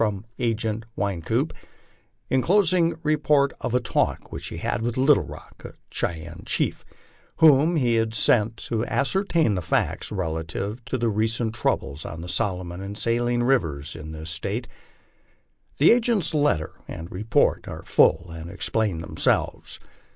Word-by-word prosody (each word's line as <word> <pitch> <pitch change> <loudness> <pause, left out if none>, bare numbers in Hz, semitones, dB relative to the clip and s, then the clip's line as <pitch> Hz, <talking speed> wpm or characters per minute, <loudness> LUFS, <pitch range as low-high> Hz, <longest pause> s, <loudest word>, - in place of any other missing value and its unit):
from 105 -2 0
Agent 115 -2 -1
Wynkoop, 95 -5 -1 0.8
en 130 - +3
closing 180 -1 +3
report 150 -2 +3
of 120 - -1
a - - +4
talk 120 - -1
whieh'he - - -6
had - - -2
with 120 +1 -2
Little 135 +2 +5
Rock, - - -11
a - - -9 0.2
Cheyenne 85 0 -3
chief, - - -1 0.5
whom 160 +1 +5
he 125 -6 +2
had 110 0 0
sent 110 +1 +3
to 115 -1 -2
as 140 +3 0
certain 170 - +2
the 90 - -1
facts 80 - -1
relative 95 +5 -3
to 130 -1 -1
the 120 -1 0
recent 110 +1 0
troubles 75 -8 -1
on 85 - -7
the 85 - -7
Solomon 90 -3 -2
and 100 +1 -6
Saline 120 +1 +1
rivers, 80 - 0
in 80 -1 -8
this 80 +1 -6
State; 100 +9 -3 1.1
The 150 - +6
agent's 230 -8 +2
letter 145 - +1 0.2
and 85 +1 -7
report 105 +5 +1
are - - -7
full, 85 +2 +3
and 80 0 -8
explain 105 0 -1
themselves. 80 0 -1
110 Hz, 150 wpm, -24 LUFS, 85-135 Hz, 1.1 s, The